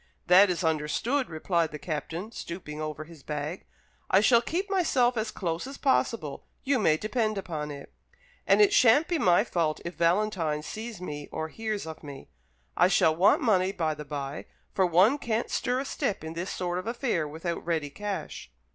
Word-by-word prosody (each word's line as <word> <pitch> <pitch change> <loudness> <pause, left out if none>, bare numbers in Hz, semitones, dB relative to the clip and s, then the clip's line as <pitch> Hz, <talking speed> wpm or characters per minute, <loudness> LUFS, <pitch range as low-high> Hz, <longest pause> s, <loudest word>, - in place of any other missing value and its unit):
"That 185 +3 +7
is 180 0 -1
understood," 160 - 0
replied 165 +1 0
the 150 - -6
Captain, 165 +6 -5
stooping 170 -7 -7
over 155 0 -4
his 160 -1 -14
bag; 150 +4 -5 0.4
"I 190 - +5
shall 230 +3 +5
keep 350 - -2
myself 280 -11 +2
as 220 -1 -1
close 175 0 -3
as 275 +1 -8
possible, 230 - 0 0.2
you 270 -1 +2
may 155 -7 +3
depend 215 +2 -1
upon 155 -6 -4
it. 140 -1 -9 0.5
And - - +6
it 405 -1 +3
shan't 280 - +5
be 345 -3 0
my 175 -7 +4
fault 160 -3 -1
if 170 - -4
Valentine 170 -4 +1
sees 220 +2 -7
me 145 -5 -6
or 160 0 -4
hears 215 0 -4
of 160 -1 -8
me. 140 - -10 0.5
I 180 - +5
shall 160 -4 +3
want 185 +5 +4
money, 190 -5 +3
by 165 -5 -1
the 150 0 -8
bye; 140 0 -5 0.3
for 190 -2 +3
one 190 - +4
can't 230 -2 -2
stir 250 +1 0
a 270 - -3
step 205 -8 -2
in 160 0 -6
this 170 +3 -4
sort 180 -1 -2
of 185 - -7
affair 230 - -1
without 165 +3 -4
ready 160 -4 -2
cash." 205 - -5
180 Hz, 185 wpm, -28 LUFS, 155-225 Hz, 0.5 s, That